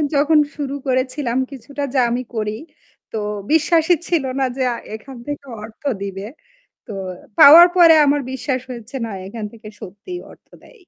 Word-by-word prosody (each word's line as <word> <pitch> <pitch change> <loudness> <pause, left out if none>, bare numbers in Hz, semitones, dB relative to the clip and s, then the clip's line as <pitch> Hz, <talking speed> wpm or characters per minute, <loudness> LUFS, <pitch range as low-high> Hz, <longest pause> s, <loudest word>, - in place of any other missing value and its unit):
যখন 300 +2 +4 0.2
শুরু 280 -2 -4
করেছিলাম 255 -1 -1
কিছুটা 280 +2 -7
যা 265 - +3
আমি 245 +2 -2
করি। 215 -1 -2 0.6
তো 220 - -4 0.3
বিশ্বাসই 320 +2 +3
ছিল 335 -6 +1 0.2
না 265 - +2
যে 260 - 0
আ - - -4 0.2
এখান 260 +3 -11
থেকে 285 -1 -5 0.2
অর্থ 220 +4 -13 0.2
দিবে। 195 0 -5 0.6
তো 220 - -8 0.5
পাওয়ার 335 +5 +10
পরে 335 -2 +8
আমার 285 +1 +2
বিশ্বাস 265 -1 -2
হয়েছে 240 +1 -8
না, - - -7 0.2
এখান 215 +2 -7
থেকে 220 -2 -12
সত্যিই 205 - -8
অর্থ - - -22
দেয়। - - -18
265 Hz, 160 wpm, -19 LUFS, 230-295 Hz, 0.6 s, পাওয়ার